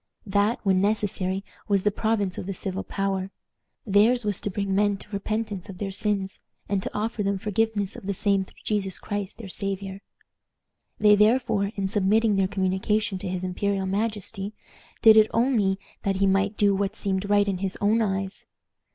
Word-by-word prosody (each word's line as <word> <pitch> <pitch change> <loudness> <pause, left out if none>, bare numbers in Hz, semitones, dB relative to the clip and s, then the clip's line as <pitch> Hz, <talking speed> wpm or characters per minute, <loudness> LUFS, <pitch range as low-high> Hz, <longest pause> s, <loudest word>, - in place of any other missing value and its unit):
That, 205 +3 +1
when 190 -2 +3
necessary, 200 -2 0 0.2
was 200 -2 +2
the 210 - +3
province 205 -3 -1
of - - -6
the 195 - -3
civil 190 +1 -4
power. 195 -1 -2 0.6
Theirs 220 +3 +4
was 205 -3 -1
to - - -1
bring 200 0 -2
men 205 0 +2
to 200 - -10
repentance 205 -1 -3
of 190 - -8
their 195 0 -3
sins, 195 -1 -1 0.3
and 200 -1 0
to - - -3
offer 215 +1 -2
them 200 -1 0
forgiveness 210 0 -1
of 190 - -9
the 200 - 0
same 195 0 +2
through - - -18
Jesus 195 -3 -1
Christ 205 -1 -4
their 225 - -8
Savior. 195 0 -4 1.0
They 210 0 +6
therefore, 210 -2 +3
in 195 -1 -1
submitting 210 +2 +2
their 195 -1 +2
communication 195 +1 0
to - - -5
his 185 0 -3
imperial 195 +1 -1
majesty, 205 0 -2 0.5
did 220 -1 +9
it 215 0 +6
only 225 -6 +2 0.2
that 195 -1 0
he 195 +1 +2
might 195 +2 +2
do 205 -1 +4
what 195 0 -1
seemed 195 0 -2
right 205 0 +4
in 190 -2 -1
his 190 -1 -2
own 215 +3 +3
eyes. 195 -2 -2
200 Hz, 180 wpm, -25 LUFS, 195-210 Hz, 1.0 s, did